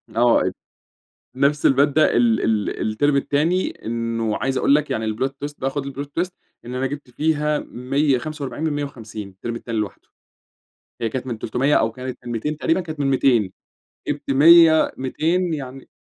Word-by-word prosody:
آه، 120 0 +4
أب - - -1 0.8
نفس 140 +2 +2
المادة، 145 +3 +3
ال 115 -2 +3
ال 110 -2 0
التيرم 145 +7 +1
التاني، 155 +6 +1 0.2
إنه 115 -1 -1
عايز 135 0 -1
أقول 140 - +4
لَك 150 -1 +1
يعني 110 -4 -1
الplot 130 +5 0 0.2
twist 145 0 -5
بقى 135 - -1
خُد 140 0 -4
الplot 140 +1 -5
twist 180 +1 -1 0.3
إن 120 +1 -7
أنا 130 +1 -1
جِبت 145 -1 -6
فيها 150 +2 0
145 140 +3 -2
من 160 - 0
150 115 -8 -6
التيرم 100 +5 -6
التاني 115 -1 -4
لوحده. 105 -2 -5 0.9
هي 115 - 0
كانت 130 +3 -4
من 120 -3 -4
300 130 +7 +1
أو 115 - +2
كانت 130 +2 -6
من 120 - -5
200 145 +7 -2
تقريبًا، 165 +4 +1
كانت 155 -3 -7
من 140 - +1
200 125 -7 +2 0.6
جِبت 145 -1 -3
100 160 +3 +7
200 165 +6 0
يعني 135 -2 -8
135 Hz, 170 wpm, -22 LUFS, 120-150 Hz, 0.9 s, 100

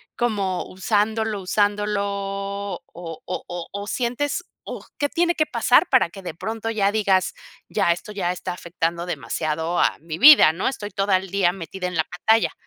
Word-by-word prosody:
como 200 -6 -1
usándolo 215 +2 0
usándolo 205 +2 +1
o 200 0 -4
o 170 +1 -6
o 175 -1 -6
o 200 +1 -6
sientes 255 +9 -1 0.2
o - - -7
qué 290 - +1
tiene 345 +2 +1
que 310 - +2
pasar - - +3
para - - +4
que 195 - -11
de 175 - -5
pronto 225 +6 -4
ya 200 -3 +2
digas 195 -3 +2 0.3
ya - - +1
esto 175 +5 -4
ya 190 -4 -1
está 180 0 -4
afectando 170 -1 -3
demasiado 160 +3 -2
a - - +2
mi 160 0 -6
vida, 285 - +9
no?, 165 +4 -2
estoy 210 -6 -3
toda 195 -1 +2
el 190 +1 -7
día 190 -2 +2
metida 180 0 -7
en 180 - -5
la 160 -1 +1
pantalla. 220 +5 +1
195 Hz, 175 wpm, -23 LUFS, 175-210 Hz, 0.3 s, vida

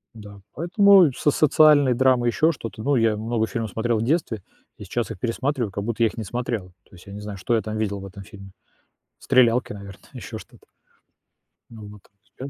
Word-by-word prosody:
Да, 105 -2 -12
поэтому 190 +2 +5
и - - 0
в - - -12
с 150 - +2
социальной 150 -3 +4
драмой 125 -1 +2
ещё 160 +7 +2
что-то, 110 -7 -8
ну, 145 +3 +1
я 115 -3 +2
много 110 +1 -2
фильмов 115 -3 -4
смотрел 115 +1 -1
в - - -2
детстве 125 - -1 0.4
и 105 - -9
сейчас 115 +4 -3
их 105 - -7
пересматриваю, 120 -1 -2
как 100 - -4
будто 115 +1 -1
я - - +5
их - - -12
не 110 - -5
смотрел. 115 -3 -4 0.2
То - - -22
есть 90 - -16
я 100 - -11
не 105 - -8
знаю, 105 -1 -7
что 105 +6 -1
я 110 - +1
там 110 0 -5
видел 100 -2 -2
в 95 - -8
этом 100 +1 -11
фильме. 95 0 -13 0.7
Стрелялки, 125 -3 +2
наверное, 100 -1 -11
ещё - - -8
что-то. - - -16 1.0
Ну 110 -3 -11
вот 105 -1 -14 0.2
спец. 135 +2 -10
115 Hz, 215 wpm, -23 LUFS, 105-130 Hz, 1.0 s, поэтому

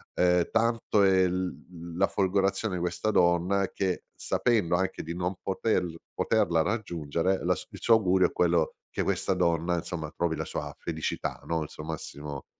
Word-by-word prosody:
ehm, 90 -1 +3
tanto 115 -2 +2
è 95 -1 +5
l 90 -2 -5
la 95 - +4
folgorazione 95 +1 +1
di 90 - -3
questa 90 +4 -1
donna 90 +2 +3
che 95 -2 -2
sapendo 105 -9 +1
anche 95 +1 -1
di 85 +2 -5
non 90 +2 -2
poter 95 0 0 0.3
poterla 80 -1 +2
raggiungere 90 -3 -1
la - - +2 0.2
il - - -9
suo 115 - +6
augurio 95 -4 +3
è - - -12
quello 85 -2 +2 0.2
che - - -2
questa 95 - 0
donna 85 -1 +1
insomma 80 -2 -4
trovi 85 -2 0
la - - -3
sua - - -5
felicità, 80 -2 -3
no, 80 -1 -1
il 75 - -8
suo 75 - -9
massimo 75 -3 -6
90 Hz, 165 wpm, -28 LUFS, 85-95 Hz, 0.3 s, suo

